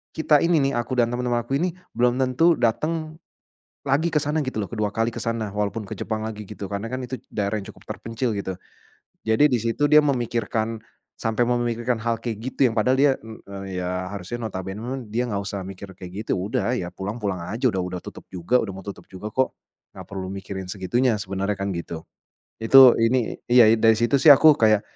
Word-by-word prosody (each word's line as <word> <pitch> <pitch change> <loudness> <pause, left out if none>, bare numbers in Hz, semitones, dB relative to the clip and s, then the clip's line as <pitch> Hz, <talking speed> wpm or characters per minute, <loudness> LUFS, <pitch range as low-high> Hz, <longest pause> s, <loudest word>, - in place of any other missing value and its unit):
kita 155 -2 +4
ini 165 -3 +3
nih, - - -5
aku 120 +2 -3
dan 120 -1 +2
teman-teman 120 -1 -1
aku 135 +4 -1
ini 180 0 -1 0.2
belum 120 0 +2
tentu 165 +7 +3
datang 155 +7 -1 0.7
lagi 155 +5 +2
ke 150 - +2
sana 150 +1 -1
gitu 130 -5 -4
loh, 100 - -2
kedua 105 -3 -2
kali 115 +2 0
ke - - -5
sana 115 -2 -2
walaupun 105 0 -2
ke - - -6
Jepang 110 -1 -3
lagi 110 -1 -5
gitu, 100 0 -7
karena 100 +3 -3
kan 130 - -3
itu 130 - -4
d - - -33
daerah 105 0 -1
yang 95 - -9
cukup - - -21
terpencil 115 +2 -3
gitu. 95 -1 -3 0.8
Jadi 110 +6 +4
di 125 -3 +1
situ, 115 +6 0
dia 150 0 +8
memikirkan 115 -5 -1 0.4
sampai 115 +2 +1
memikirkan 120 -1 0
hal 115 0 0
kayak 115 -3 -4
gitu 130 +3 0
yang 115 - -4
padahal 125 +4 +3
dia, 140 -1 +5
e 115 - -12 0.2
eee, 100 0 -6 0.2
ya 90 +1 -3
harusnya 100 +4 -6
notabene, 105 +8 -5
dia 120 +2 0
nggak 105 - -2
usah 100 0 -4
mikir 95 0 -9
kayak 90 -1 -9
gitu, - - 0
udah 100 +4 -1
ya 90 - -4
pulang, 100 +5 -5
pulang 95 -4 -2
aja, 120 +5 +1
udah 100 - -2
udah 90 0 -4
tutup - - -10
juga, 90 +6 +1
udah 100 -3 -4
mau 95 - -8
tutup 100 - -8
juga 95 +3 -7
kok, 130 0 +1 0.4
gak - - -10
perlu 95 -1 -5
mikirin 95 0 -6
segitunya 110 +4 0
sebenarnya 100 +1 -2
kan 100 - -1
gitu. 85 -1 -5 0.6
Itu, 130 +2 +8
ini 115 +1 +1
iya 120 -3 +7
dari 115 0 +5
situ 120 +4 +2
sih, 145 +1 +9
aku 155 +3 +7
kayak, 110 -2 +4
115 Hz, 210 wpm, -23 LUFS, 100-130 Hz, 0.8 s, sih